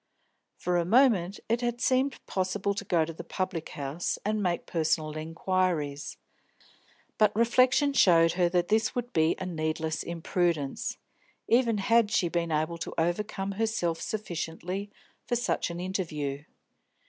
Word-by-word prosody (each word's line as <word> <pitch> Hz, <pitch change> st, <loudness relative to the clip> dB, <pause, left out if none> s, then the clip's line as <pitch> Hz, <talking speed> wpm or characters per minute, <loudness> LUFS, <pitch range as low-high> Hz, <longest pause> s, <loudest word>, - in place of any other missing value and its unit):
For 180 Hz, 0 st, 0 dB
a 170 Hz, -, +2 dB
moment 200 Hz, -3 st, +3 dB
it 230 Hz, +2 st, +1 dB
had 240 Hz, 0 st, -1 dB
seemed 260 Hz, +2 st, +1 dB
possible 195 Hz, +1 st, -1 dB
to 200 Hz, -, -4 dB
go 170 Hz, -5 st, +2 dB
to 165 Hz, -, -7 dB
the -, -, -8 dB
public 185 Hz, -4 st, -3 dB
house 145 Hz, +4 st, -2 dB
and 215 Hz, 0 st, 0 dB
make 175 Hz, -3 st, -1 dB
personal 155 Hz, -2 st, 0 dB
inquiries, 165 Hz, -2 st, -1 dB, 1.0 s
but 210 Hz, -1 st, +4 dB
reflection 255 Hz, +5 st, +4 dB
showed 165 Hz, -9 st, +5 dB
her 175 Hz, 0 st, +2 dB
that 175 Hz, 0 st, +1 dB
this 220 Hz, +1 st, +2 dB
would 245 Hz, 0 st, -3 dB
be 160 Hz, 0 st, +3 dB
a 185 Hz, -, -5 dB
needless 160 Hz, -2 st, -2 dB
imprudence, 170 Hz, -3 st, -1 dB, 0.5 s
even 230 Hz, -2 st, +3 dB
had 230 Hz, +2 st, +3 dB
she 175 Hz, -4 st, +1 dB
been 170 Hz, -1 st, -1 dB
able 155 Hz, +2 st, -1 dB
to -, -, -5 dB
overcome 195 Hz, +4 st, -1 dB
herself 195 Hz, -6 st, -1 dB
sufficiently 180 Hz, 0 st, -4 dB, 0.4 s
for 240 Hz, -, +1 dB
such 240 Hz, -6 st, 0 dB
an 170 Hz, 0 st, -5 dB
interview. 155 Hz, -6 st, -3 dB
180 Hz, 145 wpm, -28 LUFS, 165-215 Hz, 1.0 s, showed